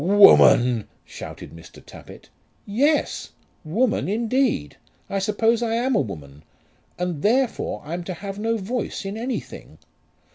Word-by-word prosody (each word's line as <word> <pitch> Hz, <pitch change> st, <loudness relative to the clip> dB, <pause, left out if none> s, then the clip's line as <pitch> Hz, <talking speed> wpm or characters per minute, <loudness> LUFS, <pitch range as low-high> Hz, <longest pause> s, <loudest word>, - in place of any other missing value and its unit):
"Woman!" 125 Hz, -, +6 dB, 0.2 s
shouted -, -, -9 dB
Mr. 85 Hz, 0 st, -14 dB
Tappitt. -, -, -14 dB, 0.3 s
"Yes; 280 Hz, +9 st, 0 dB, 0.3 s
woman 215 Hz, +7 st, 0 dB
indeed! 230 Hz, -, 0 dB, 0.3 s
I 195 Hz, -, 0 dB
suppose 225 Hz, +4 st, +1 dB
I 230 Hz, -1 st, 0 dB
am 245 Hz, +2 st, +1 dB
a -, -, +3 dB
woman, 75 Hz, -7 st, -8 dB, 0.6 s
and 175 Hz, -4 st, -3 dB
therefore 245 Hz, -, 0 dB
I'm 170 Hz, +3 st, -4 dB
to 185 Hz, -, -5 dB
have 200 Hz, +3 st, -7 dB
no 225 Hz, +1 st, 0 dB
voice 220 Hz, +1 st, -4 dB
in 195 Hz, +1 st, -4 dB
anything. 240 Hz, +3 st, -6 dB
205 Hz, 130 wpm, -23 LUFS, 170-235 Hz, 0.6 s, Woman